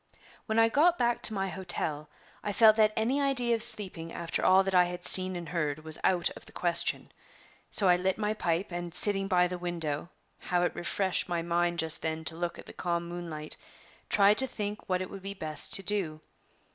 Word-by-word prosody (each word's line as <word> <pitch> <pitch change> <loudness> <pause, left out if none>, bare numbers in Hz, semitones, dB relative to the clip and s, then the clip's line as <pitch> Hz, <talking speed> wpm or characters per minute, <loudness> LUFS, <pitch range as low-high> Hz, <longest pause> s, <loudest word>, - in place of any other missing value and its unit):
When 220 0 -2
I 225 0 +4
got 330 +9 +2
back 240 -1 -1
to 220 - 0
my 195 0 -2
hotel, 155 -5 -3 0.3
I 205 - -3
felt 220 0 +5
that 215 -1 +3
any 250 +6 -1
idea 255 -4 0
of 225 - -2
sleeping 185 -7 +4
after 170 -1 -5
all 190 +1 +4
that 195 0 -4
I 180 -1 +4
had 175 0 -4
seen 185 0 +8
and 175 -1 -8
heard 155 -3 -4
was 155 -1 -2
out 175 -2 +1
of - - -14
the - - -14
question; 175 -1 +2 0.6
so 200 - +1
I 180 -1 +4
lit 185 +1 -2
my 210 0 -2
pipe, 175 -2 -3
and, 175 0 -6
sitting 195 0 +1
by 180 -2 +2
the 180 0 -7
window 170 -3 -5 0.3
how 180 0 -2
it 175 - -1
refreshed 190 +1 -2
my 170 -1 -3
mind 175 0 -1
just 160 -1 +4
then 160 0 -5
to 160 - -2
look 170 +1 -5
at - - -12
the - - -13
calm 170 -1 -4
moonlight! 165 -3 -7 0.5
tried 205 0 +3
to 265 - +2
think 210 -4 -7
what 185 0 -1
it 185 - -10
would 195 - -10
be 200 +1 -7
best 155 -4 +1
to 195 - -1
do. 180 -6 -3
180 Hz, 215 wpm, -28 LUFS, 170-205 Hz, 0.6 s, seen